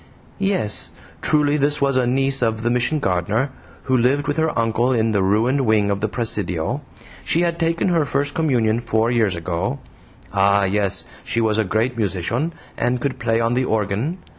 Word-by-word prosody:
"YES! 195 Hz, -, -1 dB, 0.3 s
truly 150 Hz, -1 st, +3 dB
this 145 Hz, +1 st, +2 dB
was 140 Hz, -1 st, +1 dB
a 130 Hz, -1 st, +2 dB
niece 135 Hz, +2 st, +2 dB
of 110 Hz, -2 st, 0 dB
the 120 Hz, -, +1 dB
Mission 125 Hz, +6 st, +1 dB
gardener, 105 Hz, -, 0 dB, 0.3 s
who 130 Hz, -, +1 dB
lived 135 Hz, +4 st, +2 dB
with 145 Hz, -, -1 dB
her 160 Hz, 0 st, 0 dB
uncle 115 Hz, +2 st, +1 dB
in 115 Hz, -2 st, +1 dB
the 100 Hz, -2 st, +1 dB
ruined 110 Hz, +8 st, +2 dB
wing 110 Hz, -4 st, +2 dB
of 100 Hz, -, -1 dB
the 110 Hz, -, +1 dB
presidio. 105 Hz, -, -2 dB, 0.4 s
She 165 Hz, -, +1 dB
had 170 Hz, -1 st, 0 dB
taken 165 Hz, +2 st, +1 dB
her 165 Hz, -3 st, +2 dB
first 140 Hz, 0 st, -1 dB
communion 120 Hz, -8 st, +1 dB
four 115 Hz, 0 st, 0 dB
years 110 Hz, -6 st, +1 dB
ago. 85 Hz, -2 st, -2 dB, 0.6 s
Ah, 100 Hz, 0 st, +3 dB
yes, 100 Hz, -2 st, +1 dB, 0.2 s
she 115 Hz, -, -1 dB
was 110 Hz, -1 st, +1 dB
a -, -, +3 dB
great 110 Hz, +5 st, -1 dB
musician, 110 Hz, -, -1 dB, 0.3 s
and 125 Hz, +1 st, 0 dB
could 130 Hz, 0 st, -3 dB
play 115 Hz, -1 st, +1 dB
on 115 Hz, +1 st, +1 dB
the 130 Hz, +1 st, +1 dB
organ. 110 Hz, -, -1 dB
120 Hz, 185 wpm, -21 LUFS, 105-140 Hz, 0.6 s, truly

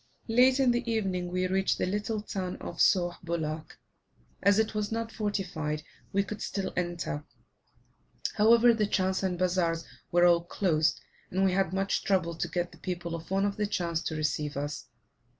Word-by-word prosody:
Late 255 Hz, +3 st, +5 dB
in 260 Hz, -2 st, +5 dB
the 240 Hz, -1 st, -1 dB
evening, 190 Hz, -5 st, -1 dB
we 185 Hz, +1 st, 0 dB
reached 190 Hz, +1 st, +1 dB
the -, -, 0 dB
little 210 Hz, +3 st, -2 dB
town 185 Hz, -3 st, -3 dB
of 170 Hz, -, -8 dB
Sauh 175 Hz, -2 st, +3 dB
Bulak. 160 Hz, -2 st, -3 dB, 0.6 s
As 200 Hz, +1 st, +5 dB
it 220 Hz, 0 st, +1 dB
was 210 Hz, 0 st, -2 dB
not 225 Hz, 0 st, -2 dB
fortified, 180 Hz, -8 st, -2 dB, 0.3 s
we 200 Hz, +1 st, +2 dB
could 210 Hz, +1 st, -7 dB
still 195 Hz, -1 st, -3 dB
enter; 175 Hz, -4 st, -2 dB, 1.1 s
however, 230 Hz, +2 st, +6 dB
the 215 Hz, -2 st, +1 dB
chans 190 Hz, -2 st, +1 dB
and 185 Hz, -2 st, -1 dB
bazaars 175 Hz, -2 st, +1 dB, 0.3 s
were 175 Hz, 0 st, +5 dB
all 170 Hz, -1 st, +5 dB
closed, 165 Hz, -4 st, +1 dB, 0.3 s
and 190 Hz, +1 st, +1 dB
we 190 Hz, -, +3 dB
had 190 Hz, -2 st, +1 dB
much 195 Hz, +1 st, 0 dB
trouble 185 Hz, -4 st, +1 dB
to 165 Hz, -, -2 dB
get 175 Hz, -1 st, -2 dB
the -, -, -16 dB
people 175 Hz, -2 st, -4 dB
of 165 Hz, -1 st, -6 dB
one 195 Hz, +1 st, +2 dB
of 200 Hz, -1 st, -1 dB
the 210 Hz, -1 st, 0 dB
chans 170 Hz, -5 st, -1 dB
to 160 Hz, -, -2 dB
receive 150 Hz, -1 st, -1 dB
us. 145 Hz, +1 st, -4 dB
185 Hz, 180 wpm, -29 LUFS, 170-205 Hz, 1.1 s, however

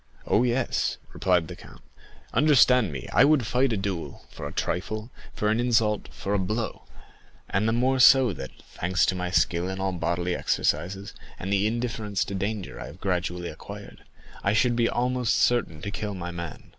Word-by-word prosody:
"Oh, -, -, +3 dB
yes," 125 Hz, +1 st, 0 dB, 0.2 s
replied 90 Hz, -3 st, +1 dB
the -, -, -8 dB
count; -, -, -15 dB, 0.5 s
"understand 125 Hz, -, +5 dB
me, 65 Hz, -4 st, -6 dB
I -, -, +6 dB
would 145 Hz, -5 st, +4 dB
fight 125 Hz, +3 st, +2 dB
a 110 Hz, -, 0 dB
duel 95 Hz, -7 st, -4 dB
for 75 Hz, -, -6 dB
a -, -, -7 dB
trifle, 110 Hz, -, -3 dB, 0.2 s
for 105 Hz, -, 0 dB
an 110 Hz, -, +1 dB
insult, 115 Hz, -3 st, +1 dB
for 100 Hz, -, -4 dB
a 100 Hz, -, +2 dB
blow; 105 Hz, +4 st, -3 dB, 0.6 s
and 100 Hz, +3 st, 0 dB
the -, -, +3 dB
more 130 Hz, +3 st, +2 dB
so 130 Hz, -3 st, +7 dB
that, 65 Hz, -5 st, -7 dB
thanks 90 Hz, +2 st, 0 dB
to 95 Hz, -, 0 dB
my 90 Hz, 0 st, -2 dB
skill 90 Hz, 0 st, +1 dB
in 95 Hz, 0 st, -4 dB
all 95 Hz, 0 st, 0 dB
bodily 85 Hz, 0 st, -1 dB
exercises, 95 Hz, +5 st, -1 dB, 0.2 s
and 95 Hz, +2 st, -3 dB
the 100 Hz, +1 st, +2 dB
indifference 110 Hz, -3 st, -2 dB
to -, -, -6 dB
danger 95 Hz, -, -3 dB
I -, -, -6 dB
have 80 Hz, -, -12 dB
gradually 90 Hz, -2 st, -2 dB
acquired, -, -, -10 dB, 0.4 s
I 100 Hz, -, +2 dB
should 120 Hz, +2 st, +3 dB
be 115 Hz, -1 st, +2 dB
almost 125 Hz, -1 st, 0 dB
certain 85 Hz, -11 st, +1 dB
to 100 Hz, -, -3 dB
kill 105 Hz, -1 st, -4 dB
my 90 Hz, -1 st, -5 dB
man. 85 Hz, -2 st, -7 dB
100 Hz, 185 wpm, -26 LUFS, 90-120 Hz, 0.6 s, so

